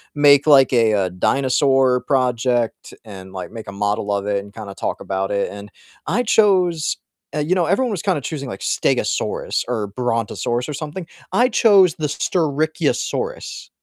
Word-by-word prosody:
make 145 0 +5
like 135 -3 +6
a, 115 -3 +3
uh, 95 -3 +1
dinosaur 130 +5 +2
project 125 -3 0
and, 95 -2 -11
like, 95 +2 -7
make 115 -1 -9
a - - -6
model 105 0 -1
of 100 0 -2
it 100 -1 0
and 100 0 -15
kinda 105 -3 -8
talk - - -3
about 95 0 -2
it, 100 0 0
and 100 +1 -9 0.4
I 245 - +1
chose 185 -8 +2 0.4
uh, 150 - -2
you 165 +5 +1
know, 175 -2 +2
everyone 230 +7 +1
was 190 - -3
kinda 185 -7 0
choosing 140 -2 -5
like 95 - -7
Stegosaurus - - -1
or 110 -4 -2
Brontosaurus 120 +2 -2
or 150 - -4
something, 155 +4 -6 0.2
I 245 +1 +3
chose 195 -9 +5
the 155 -1 -2
Styracosaurus. 160 - -2
135 Hz, 165 wpm, -20 LUFS, 105-160 Hz, 0.4 s, like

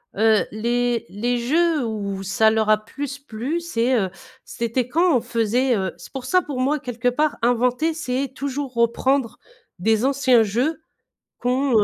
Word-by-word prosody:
Heu, 220 -1 +3
les 240 +2 -1
les 240 +4 -1
jeux 310 +4 +2
où 200 -3 -4
ça 220 +3 +3
leur 220 -1 +1
a 215 - +6
plus 280 -1 -5
plu 280 +4 -4
c'est 255 -7 0
heu, 190 -2 -1 0.4
c'était 235 +1 -2
quand 330 +2 +3
on 235 - -2
faisait, 240 +2 +1
heu 190 -3 -1
c'est - - -13
pour 265 -2 -6
ça, 365 +7 +2
pour 275 -4 -5
moi, 285 +4 +2
quelque 245 -3 -3
part 295 +5 +1
inventer, 250 +7 +1
c'est 265 -3 -2
toujours 275 -1 -4
reprendre 235 +2 +1 0.4
des 220 +5 +2
anciens 265 -4 +4
jeux 250 +10 -1 0.6
qu'on, 250 -3 +2
245 Hz, 160 wpm, -22 LUFS, 225-275 Hz, 0.6 s, a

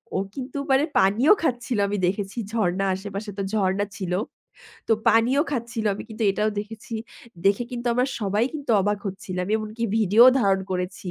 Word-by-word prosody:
ও - - +2 0.2
কিন্তু 265 +1 -6
মানে 270 +2 +4
পানিও 220 - +5
খাচ্ছিল 245 -4 -1
আমি 205 +1 -2
দেখেছি 195 +3 -3
ঝর্ণা 195 -4 0
আশেপাশে 200 +2 -6
তো - - -2
ঝর্ণা 200 -1 +1
ছিল। 185 -3 -3 0.8
তো - - +4 0.2
পানিও 240 +6 +4
খাচ্ছিল 235 -4 -3
আমি - - -7
কিন্তু 220 0 -6
এটাও 210 +2 0
দেখেছি। 225 +2 -9 0.5
দেখে 200 +4 +3
কিন্তু 245 -1 -5
আমরা 250 +2 +2
সবাই 205 +2 +1
কিন্তু 290 -4 -4
অবাক 205 +1 0
হচ্ছিলাম। 185 -2 -4
এমনকি 215 +1 -4
ভিডিও 220 +2 +6
ধারণ 195 -5 +2
করেছি। 180 0 -3
210 Hz, 160 wpm, -24 LUFS, 195-235 Hz, 0.8 s, ভিডিও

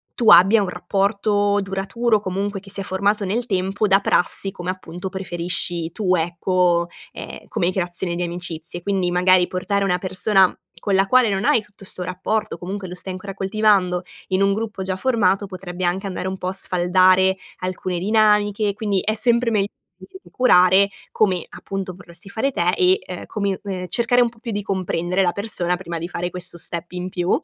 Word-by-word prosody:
tu 230 -3 +3
abbia 205 +4 +7
un 195 - -2
rapporto 205 +2 0
duraturo, 205 +4 0
comunque 200 +1 -3
che 195 - -15
si 200 0 +1
è - - -4
formato 200 +3 0
nel 230 +6 -2
tempo 195 +2 0
da 195 +1 +5
prassi, 195 +1 +3
come 180 -2 -6
appunto, 185 0 -6
preferisci 175 -2 -2
tu, 185 -1 0
ecco, 175 0 +1 0.3
ehm, - - -9
come 175 +1 0
creazione 175 -1 -2
di 175 - -3
amicizie. 175 -1 -5
Quindi, 190 -2 0
magari, 180 0 +4
portare 200 +2 -1
una 180 -2 +1
persona 190 +1 +2 0.2
con 200 -2 0
la 195 +1 +3
quale 250 0 +4
non 195 0 -1
hai 225 - +4
tutto 200 -2 -17
'sto 180 - -4
rapporto, 210 +4 -2
comunque 190 +1 -6
lo 180 - -7
stai 185 +1 -4
ancora 195 +2 -7
coltivando, 195 -2 +1 0.2
in 185 0 0
un 195 0 +3
gruppo 210 -2 -4
già 185 0 -2
formato, 205 -5 +1
potrebbe 185 -1 -5
anche 190 +3 -1
andare 185 -1 -4
un 190 0 -4
pò 185 - -3
a - - -2
sfaldare 185 +1 +3 0.2
alcune 185 -1 -3
dinamiche 210 0 +2
quindi, 205 -2 -1
è 215 - 0
sempre 235 +2 +2
megl 210 -3 +1 0.7
curare 195 -5 +5 0.2
come, 185 -5 +1
appunto, 195 -2 -6
vorresti 175 0 -11
fare 225 +7 -1
te 175 -8 +1
e, 185 +1 +3
ehm, 180 - -7
come 200 -3 -2
ehm, 185 -3 -4
cercare 240 +3 +2
un 240 - +4
pò 230 - -22
più 230 0 -5
di 205 -1 -2
comprendere 185 -1 -1
la 180 -2 +2
persona 180 -4 -2
prima 170 -2 -6
di 170 +2 -5
fare 175 0 -3
questo 180 -1 -4
step 170 +1 -3
in 180 0 -4
più. 180 0 -3
190 Hz, 185 wpm, -21 LUFS, 180-205 Hz, 0.7 s, abbia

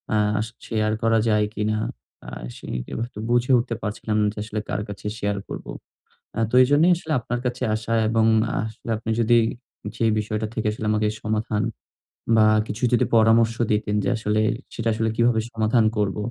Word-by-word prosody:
আ - - +3 0.3
শ - - -9 0.2
share 110 -1 0
করা 115 0 +3
যায় 105 -1 +3
কিনা? 110 0 -1 0.5
আ - - -5 0.3
শিক 60 0 -5
এবারতো 115 -1 -5
বুঝে 120 +2 +2
উঠতে 120 0 -1
পারছিলাম 105 +1 -2
না 105 - +3
যে, - - -27
আসলে 110 0 -4
কার - - -1
কাছে 100 - -9
শেয়ার 100 0 -1
করব? - - -7 0.7
আ - - 0
তো 125 - -1
এজন্যই 145 +7 +4
আসলে 160 -2 -4
আপনার 120 +1 -3
কাছে 125 +1 -2
আসা 110 +1 -3 0.2
এবং 115 0 +3 0.4
আসলে 110 +1 -9
আপনি 110 +1 -4
যদি 120 +1 +4 0.6
যে, - - -2 0.2
বিষয়টা 110 +1 -2
থেকে 110 -2 -2
আসলে 110 0 -5
আমাকে 105 0 +1 0.2
সমাধান 110 -1 -1 0.7
বা 110 - +6 0.2
কিছু 110 - -6
যদি 120 - +4
পরামর্শ 115 +1 +4 0.2
দিতেন 105 0 0
যে, - - 0
আসলে 110 -1 0 0.3
সেটা 115 0 -2
আসলে 110 0 0
কীভাবে 115 -1 +3
সমাধান 110 +1 +2
করব? 105 -2 0
110 Hz, 175 wpm, -23 LUFS, 105-115 Hz, 0.7 s, বা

